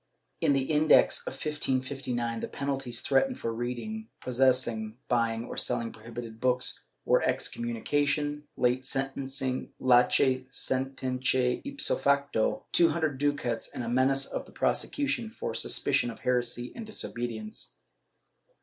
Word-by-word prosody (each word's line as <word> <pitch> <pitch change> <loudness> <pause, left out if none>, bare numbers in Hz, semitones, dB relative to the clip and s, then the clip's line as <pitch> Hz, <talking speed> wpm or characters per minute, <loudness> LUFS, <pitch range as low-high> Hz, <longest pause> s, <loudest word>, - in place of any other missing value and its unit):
^ - - -48 0.4
In 145 - +4
the 135 -1 +2
Index 155 +2 +4
of - - -3
1559, 130 -5 -1
the - - -3
penalties 135 -4 -3
threatened 250 - +2
for 115 - -2
reading, 125 - -4
posses 130 0 +3
sing, 110 -1 -4
buying 115 -2 +1
or - - -7
selling 115 0 0
prohibited 115 0 -8
books 125 0 0 0.2
were - - +4
excommunication 145 +5 0 0.2
latce 130 0 +1
sententce 130 -1 0
ipso 280 +2 +3
facto, 140 -5 +1
two 170 -1 +5
hundred 155 -5 -1
ducats 145 -5 -1
and 125 - -5
a - - -4
menace 135 +2 +3
of - - -5
prosecution 255 -5 0
for 220 - -5
suspicion 130 +3 +1
of 115 - -9
heresy 125 -1 -1
and 230 -2 -7
disobedience. 120 - -4
130 Hz, 120 wpm, -29 LUFS, 120-140 Hz, 0.4 s, two